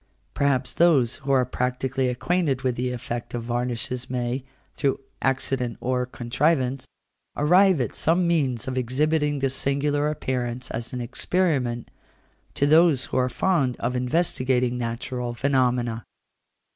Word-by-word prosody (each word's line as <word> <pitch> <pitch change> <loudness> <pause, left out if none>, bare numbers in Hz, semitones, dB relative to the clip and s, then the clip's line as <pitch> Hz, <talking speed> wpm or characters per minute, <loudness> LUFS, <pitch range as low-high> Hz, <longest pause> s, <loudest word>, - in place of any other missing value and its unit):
Perhaps 130 -3 +1
those 145 -9 +3
who 140 -1 -3
are 130 -2 +4
practically 130 +1 -1
acquainted 140 +1 0
with 125 -2 0
the 125 +1 -2
effect 120 -1 -5
of 120 - -3
varnishes 120 +1 -3
may, 125 +1 -2 0.3
through 140 -2 0 0.2
accident 130 -2 -1
or 125 0 -1
contrivance, 130 +1 0 0.5
arrive 180 +3 +5
at 120 -5 -1
some 170 +2 +2
means 135 -9 0
of 130 0 -1
exhibiting 145 +4 +1
this 135 -1 0
singular 145 +2 +1
appearance, 125 -4 -3
as 115 0 -4
an 125 - -4
experiment, 125 -2 -1 0.6
to 140 - +2
those 155 -3 +5
who - - -3
are 125 0 +2
fond 140 -4 +1
of 125 +2 -2
investigating 125 -2 +1
natural 120 +1 -3
phenomena. 125 -4 +1
130 Hz, 135 wpm, -24 LUFS, 125-145 Hz, 0.6 s, arrive